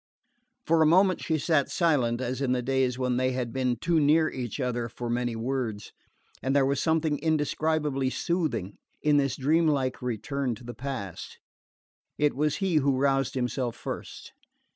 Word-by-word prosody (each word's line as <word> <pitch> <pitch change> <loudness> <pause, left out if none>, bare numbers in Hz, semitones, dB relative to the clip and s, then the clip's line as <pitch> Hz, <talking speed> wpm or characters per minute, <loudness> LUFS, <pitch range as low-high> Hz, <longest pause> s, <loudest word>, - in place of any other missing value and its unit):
For 165 0 +3
a 155 - +6
moment 185 +2 +4
she 160 - 0
sat 155 -2 +1
silent, 130 -8 +1
as 130 +1 -3
in 130 -2 +1
the 125 -1 -1
days 130 -1 +1
when 125 -1 0
they 130 0 +1
had 125 -2 -3
been 130 -2 0
too 165 +7 +1
near 155 +2 +4
each 125 0 -5
other 120 -2 -2
for 120 -1 -5
many 120 -1 -1
words; 115 -3 -3 0.5
and 135 +3 0
there 140 -1 +4
was 140 0 0
something 160 -2 +1
indescribably 150 -3 0
soothing 155 - -2 0.2
in 150 -1 +4
this 140 -2 +1
dreamlike 145 -2 +1
return 125 +2 -2
to 115 - -14
the 120 0 -7
past. 120 -7 -6 0.8
It 150 -2 +2
was 150 +1 +1
he 190 -5 +1
who 140 -2 +2
roused 135 0 +1
himself 125 -1 -2
first. - - -7
135 Hz, 165 wpm, -27 LUFS, 125-150 Hz, 0.8 s, a